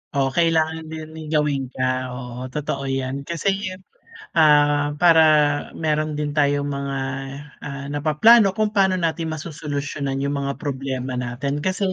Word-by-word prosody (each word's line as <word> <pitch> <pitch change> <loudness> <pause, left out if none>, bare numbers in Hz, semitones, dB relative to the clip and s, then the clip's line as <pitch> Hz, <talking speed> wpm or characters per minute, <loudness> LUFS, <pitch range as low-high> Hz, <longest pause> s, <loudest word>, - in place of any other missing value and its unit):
Oh, 135 -1 +1
kailangan 160 -1 +1
din 155 0 -7
may 160 -1 -9
gawin 150 -3 0
ka, 130 0 -1
oo 125 0 -7
totoo 140 0 -4
yan 135 +1 -3
kasi, 195 +3 -1 0.6
ah 145 -2 +4
para 165 0 +6 0.6
meron 155 -1 -1
din 150 -1 -2
tayong 145 -1 +2
mga, 140 -1 -3 0.6
ah 140 -1 -6
napaplano 190 +9 +5
kung 215 -1 +1
paano 190 -3 +3
natin 165 -2 -1
masosolusyunan 145 -3 -4
yung 140 - -1
mga 140 0 -3
problema 130 -2 -4
natin. 125 +3 -3
Kasi 190 +3 -1
145 Hz, 135 wpm, -22 LUFS, 140-160 Hz, 0.6 s, para